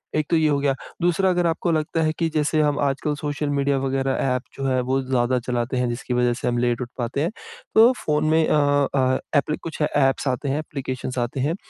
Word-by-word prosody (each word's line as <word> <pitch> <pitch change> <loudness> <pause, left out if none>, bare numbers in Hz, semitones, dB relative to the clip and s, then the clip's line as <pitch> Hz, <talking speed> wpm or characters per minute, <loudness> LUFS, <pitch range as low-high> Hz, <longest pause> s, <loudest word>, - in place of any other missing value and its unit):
एक 155 -1 +1
तो - - +3
ये 160 -1 +3
हो 145 - +2
गया, 140 -1 +1 0.3
दूसरा 175 +2 +2
अगर 175 -1 +2
आपको 170 +1 0
लगता 160 +1 0
है 155 - +2
कि 165 - +2
जैसे 155 0 +1
हम 145 -1 +1
आजकल 145 +1 0
सोशल 145 0 -3
मीडिया 140 -1 +1
वगैरह 135 0 -1 0.2
ऐप 125 - -2
जो 135 - -4
है 130 -1 +1
वो 135 +1 +2
ज़्यादा 130 -1 +1
चलाते 125 +1 -1
हैं, 125 0 +1
जिसकी 120 +1 -4
वजह 125 0 +2
से 120 - -4
हम 120 0 0
लेट 120 0 0
उठ 120 - -4
पाते 125 +2 -2
हैं, 165 - +1 0.5
तो 225 +3 +8
फ़ोन 150 0 +1
में 160 +1 +4
अ 145 -2 +3
अ, 130 -1 +2 0.2
एप्लि 150 +2 0
कुछ 160 -1 -6
अ, 150 - +3
ऐप्स 135 0 +2
आते 130 +2 -1
हैं, 140 +3 0
एप्लिकेशन्स 130 -4 -5
आते 120 +2 -2
हैं, 145 +6 0
140 Hz, 235 wpm, -23 LUFS, 130-155 Hz, 0.5 s, तो